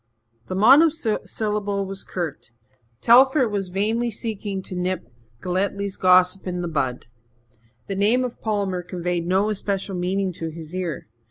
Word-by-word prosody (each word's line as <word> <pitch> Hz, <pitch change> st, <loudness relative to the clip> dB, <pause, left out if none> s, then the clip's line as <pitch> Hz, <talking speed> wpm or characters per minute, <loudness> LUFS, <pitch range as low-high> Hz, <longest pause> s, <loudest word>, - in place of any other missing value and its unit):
The 185 Hz, -, -4 dB
monosyllable 215 Hz, -, +2 dB
was 195 Hz, 0 st, -6 dB
curt. 165 Hz, -10 st, -5 dB, 0.5 s
Telford 260 Hz, +1 st, +5 dB
was 200 Hz, -2 st, -2 dB
vainly 220 Hz, +6 st, 0 dB
seeking 205 Hz, -3 st, -4 dB
to 185 Hz, -, -6 dB
nip 180 Hz, -3 st, -2 dB, 0.4 s
Galletly's 195 Hz, +2 st, -1 dB
gossip 185 Hz, +1 st, +4 dB
in 180 Hz, -1 st, -2 dB
the -, -, -2 dB
bud. 135 Hz, -6 st, -2 dB, 0.8 s
The -, -, -4 dB
name 215 Hz, +6 st, +2 dB
of 250 Hz, -2 st, -5 dB
Palmer 200 Hz, -4 st, -1 dB
conveyed 175 Hz, -1 st, -3 dB
no 195 Hz, +4 st, +2 dB
especial 195 Hz, -1 st, -2 dB
meaning 185 Hz, +1 st, -1 dB
to 165 Hz, -1 st, -5 dB
his 160 Hz, 0 st, -10 dB
ear. 180 Hz, -, -4 dB
195 Hz, 140 wpm, -23 LUFS, 180-210 Hz, 0.8 s, Telford